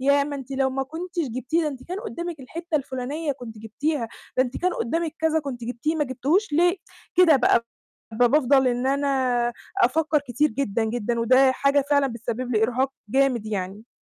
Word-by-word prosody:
ياه! 280 +1 +3
ما 285 0 -4
أنتِ 270 -1 -9
لو 270 0 +1
ما 270 +1 -1
كنتيش 335 +2 -4
جبتيه، 255 +8 -1
ده 310 - 0
أنتِ 265 -3 -8
كان 370 +3 -4
قُدامك 345 - -5
الحِتّة 330 +5 -3
الفُلانية 280 +3 -3
كنتِ 240 -5 -10
جِبتيها، 230 +4 -2 0.3
ده 255 - +5
أنتِ 250 -1 -5
كان 365 0 0
قُدامك 325 +6 -2
كذا 320 0 +2
كنتِ 260 -5 -6
جبتيه 245 +6 -2
ما 300 - +1
جبتيهوش 290 - 0
ليه، 350 +4 +3 0.4
كده 345 -4 +6
بقى 245 -2 +3 0.5
ب 225 +3 0
بافضل 270 +1 +4
إن 245 +1 -1
أنا 265 -3 +1 0.3
أفكر 305 +4 +3
كتير 295 +6 +2
جدًا، 230 -5 -1
جدًا، 235 +1 -1
وده 260 +3 +5
حاجة 280 +1 +2
فعلًا 285 -1 +4
بتسبب 240 0 -4
لي 215 - +2
إرهاق 255 +4 +1 0.2
جامد 255 -2 +2
يعني. 205 +1 -4
270 Hz, 185 wpm, -24 LUFS, 245-305 Hz, 0.5 s, كده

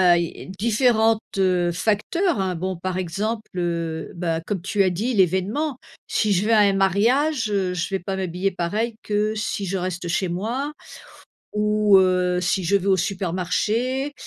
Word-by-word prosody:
heu, - - +2
i 170 - -6
i - - -12
différentes, 225 +2 +2 0.2
heu, 180 -2 +2
facteurs, 220 - 0
hein, 190 -2 -1
bon, 185 +2 -3
par 185 +1 -3
exemple, 210 +5 -3
heu, 170 -2 -2
bah, 170 -2 -1
comme 195 -5 -2
tu 200 +1 +1
as 185 - +3
dit, 210 +8 -2
l'événement. 205 - +1 0.3
Si 210 -2 +1
je 195 +2 +2
vais 230 - +3
à 215 - +6
un 200 -1 +5
mariage, 225 - +2
heu, 190 -3 0
je 170 - -2
vais 195 -1 -1
pas 190 +2 -4
m'habiller 190 +1 -1
pareil 210 +6 -2
que 210 +1 0
si 210 -1 -2
je 190 +1 -2
reste 180 -1 -3
chez 175 +2 0
moi, 235 - -2 0.8
ou, 210 -1 +4
heu, 180 -1 +2
si 185 +1 0
je 195 +4 +2
vais 195 0 -2
au 190 -1 +4
supermarché, 200 - -1
195 Hz, 175 wpm, -23 LUFS, 180-215 Hz, 0.8 s, à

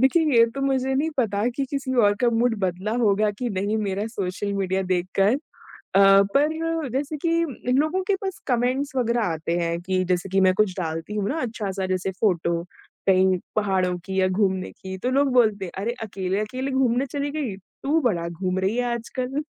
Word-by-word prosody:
देखिए, 270 +6 +4 0.2
ये 230 - +8
तो 275 - -4
मुझे 265 -1 +1
नहीं 310 +4 +1
पता 215 -3 +1
कि, 270 +3 -2
किसी 270 -2 -2
और 205 -4 +4
का 245 - +4
मूड 235 +1 +2
बदला 190 +2 -2
होगा 210 -2 +3
कि 245 - -1
नहीं 200 +2 -1
मेरा 200 0 -2
सोशल 200 -2 -3
मीडिया 190 -1 0
देखकर। 185 +3 +1
अ, 285 - -9 0.7
पर 320 +1 +1
जैसे 290 +3 -2
कि 335 +3 -1 0.4
इन 255 - +3
लोगों 310 +6 +1
के 400 - +3
पास 385 -2 -4
कमेंट्स 255 +3 0
वग़ैरह 240 -1 +1
आते 165 -1 -1
हैं 170 0 -1
कि 185 0 0
जैसे 180 +1 -1
कि 195 +1 +2
मैं 185 -1 +5
कुछ 210 -1 +2
डालती 165 +3 -4
हूँ 205 -1 -1
ना 315 - -1
अच्छा-सा, 205 -5 -3
जैसे 185 +1 -1
फ़ोटो 170 -3 0 0.4
कहीं 185 -1 +4 0.2
पहाड़ों 190 -4 +1
की 190 -1 -2
या 185 - +4
घूमने 190 -1 0
की 190 0 -8
तो 250 - +1
लोग 275 0 +2
बोलते 215 -5 +3
हैं, 175 - -7
"अरे! 230 - -1
अकेले-अकेले 210 +7 -3
घूमने 260 0 +2
चली 285 +1 -3
गई। 280 -10 -3 0.3
तू 305 +4 +2
बड़ा 180 - 0
घूम 185 +2 -2
रही 195 +4 0
है 245 - +1
आजकल।" 255 +4 -3
215 Hz, 195 wpm, -24 LUFS, 190-260 Hz, 0.7 s, ये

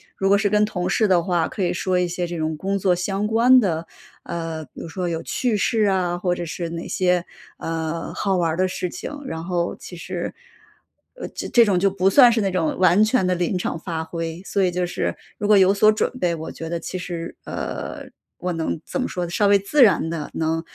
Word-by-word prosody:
如 195 - 0
果 200 - +6
是 205 0 +1
跟 210 +1 +3
同 185 -4 -1
事 210 +1 +2
的 175 -2 +4
话， 170 -2 0
可 200 - -5
以 175 -1 +1
说 180 0 0
一 180 - +1
些 175 +1 -2
这 175 0 -5
种 155 0 -1
工 195 +5 -2
作 185 -2 +3
相 195 +3 -1
关 240 +4 +6
的， 170 -6 -1 0.4
呃， 165 -2 -4
比 - - -14
如 - - -6
说 180 +1 -3
有 165 -1 -2
趣 240 -5 0
事 220 +2 +1
啊， 180 -2 +1
或 180 0 0
者 175 -1 -4
是 165 +1 -4
哪 165 0 -5
些， 180 -1 +1 0.3
呃， 165 0 -3
好 195 -2 0
玩 170 -2 +1
儿 - - -2
的 185 - +3
事 180 - -3
情。 - - -6
然 165 -9 -5
后 175 -1 -1
其 180 - -10
实， 175 +1 -5 0.8
呃， - - -6
这 240 - +3
种 195 -4 +2
就 195 +2 +3
不 190 0 +2
算 250 +2 +8
是 225 - +1
那 195 -1 0
种 170 -4 0
完 185 +2 +5
全 215 -2 +2
地 180 - +2
临 175 +1 0
场 165 - -3
发 165 -2 -4
挥。 165 +1 -5
所 200 - 0
以 185 - +3
就 180 0 -1
是 175 - -2 0.2
如 205 - -2
果 210 -1 +6
有 190 +1 +5
所 215 +2 +5
准 215 - 0
备， 175 -1 +1
我 160 0 -6
觉 165 - -7
得 170 - -1
其 185 - -5
实， 175 -2 -5
呃， - - -5 0.3
我 180 - -2
能 165 -1 -2
怎 - - -3
么 255 - -1
说 180 -1 -3
呢， - - -7
稍 200 +4 +2
微 200 0 +6
自 230 +9 +1
然 190 -6 +4
地 160 -3 -4
能 160 0 -1
180 Hz, 255 characters per minute, -22 LUFS, 170-200 Hz, 0.8 s, 算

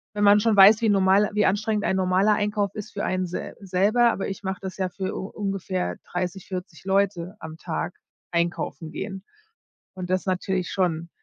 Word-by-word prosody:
wenn 205 - 0
man 205 +1 +7
schon 220 -1 +3
weiß, 205 +3 +8
wie 225 - +3
normal 195 +1 +4
wie 210 0 +2
anstrengend 210 +2 +1
ein - - +1
normaler 190 +3 +3
Einkauf 205 -1 -1
ist 210 - -7
für 205 - -2
einen 185 -1 -1
se 175 - -6
selber. 205 +6 +3
Aber 195 - -3
ich 195 +1 -7
mache 190 0 -3
das 190 -1 -6
ja 185 -1 -1
für 190 +1 -4
u 190 - -4
ungefähr 195 -3 -3 0.2
30, 180 +1 -3
40 180 -4 -7
Leute 190 -1 0
am 160 0 -8
Tag, 165 0 -4 0.4
einkaufen 170 -1 -2
gehen. 195 -2 -6 0.7
Und 185 -1 -6
das 185 0 +2
ist - - -19
natürlich 185 0 -1
schon 170 -3 -1
190 Hz, 190 wpm, -25 LUFS, 180-205 Hz, 0.7 s, weiß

